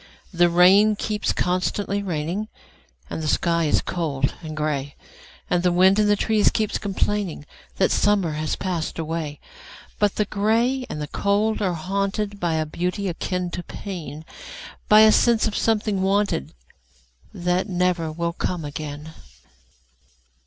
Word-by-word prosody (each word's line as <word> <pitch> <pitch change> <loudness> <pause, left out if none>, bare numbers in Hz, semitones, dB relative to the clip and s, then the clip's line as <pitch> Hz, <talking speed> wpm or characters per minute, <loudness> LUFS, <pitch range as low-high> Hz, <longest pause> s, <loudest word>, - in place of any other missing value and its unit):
The 175 0 +4
rain 190 +5 +5
keeps 210 0 -1
constantly 190 +3 -1
raining, 180 +3 -3 0.6
And 160 - -5
the 155 - -3
sky 170 +1 +1
is 150 - +2
cold 140 -6 -1
and 155 -2 -7
gray, 145 -2 -2 0.5
And 175 - +1
the 180 0 +2
wind 190 +3 +4
in 210 - +3
the 205 - +4
trees 215 0 +2
keeps 215 -2 -1
complainingThat 195 -3 -2
summer 200 -5 +2
has 155 0 -2
passed 175 -4 -3
away;—But 165 - -4
the 210 - +1
gray 230 +6 0
and 150 - -5
the 150 - -4
cold 210 +6 0
are 185 -4 0
hauntedBy 195 0 -2
a 155 - 0
beauty 180 +5 -2
akin 180 +1 -3
to 175 - -4
pain,—By 185 - -2
a 220 0 +8
sense 235 0 +3
of 215 - -1
a - - -2
something 210 -3 +1
wanted, 195 - 0 0.8
That 180 +2 -1
never 180 -3 0
will 170 +1 -2
come 175 -2 -3
again. 150 +1 -7
180 Hz, 140 wpm, -23 LUFS, 160-205 Hz, 0.8 s, a